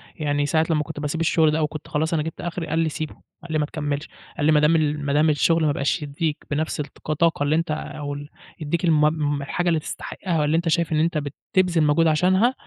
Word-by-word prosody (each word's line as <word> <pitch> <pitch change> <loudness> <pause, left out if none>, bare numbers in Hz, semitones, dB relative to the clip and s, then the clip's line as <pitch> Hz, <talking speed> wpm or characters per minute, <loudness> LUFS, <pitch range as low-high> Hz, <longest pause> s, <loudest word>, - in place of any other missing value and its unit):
يعني 145 -2 0
ساعة 160 +1 +2
لمّا 155 -2 +2
كنت 155 -1 -7
باسيب 150 +2 -2
الشغل 160 -1 +3
ده 155 - 0
أو 155 - +2
كنت 155 0 -8
خلاص 160 +2 -1
أنا 155 -2 +1
جبت 160 - -6
أخري، 175 -1 -4
قال 160 +1 0
لي: 165 -1 +2
"سيبه" 155 0 -5 0.3
قال 170 - -8
لي: 155 - +1
"ما 150 - +1
تكمّلش" 145 -1 -3 0.3
قال 145 - 0
لي: 155 - +5
"ما 150 - +5
دام 150 +2 +4
ال 150 -2 0
ما 140 - 0
دام 155 +2 +4
الشغل 160 +2 +3
ما 150 - +3
بقاش 140 +4 0
يدّيك 150 +1 -2
بنفْس 155 +2 -1
الك 150 - -4 0.3
طاقة 165 -3 +2
اللي 145 +2 +2
أنت 165 -1 0
أو 150 -1 -4
ال 145 +1 -8 0.3
يدّيك 160 +3 -1
الم 150 -2 +2
الحاجة 175 +6 -2
اللي 165 -2 +2
تستحقها، 165 +2 -4
والّا 150 +1 +2
أنت 170 0 0
شايف 170 0 +1
أنت 160 +1 +1 0.4
بتبذل 180 -4 +3
مجهود 155 +2 +3
عشانها 185 +9 +3
155 Hz, 235 wpm, -23 LUFS, 150-165 Hz, 0.4 s, لي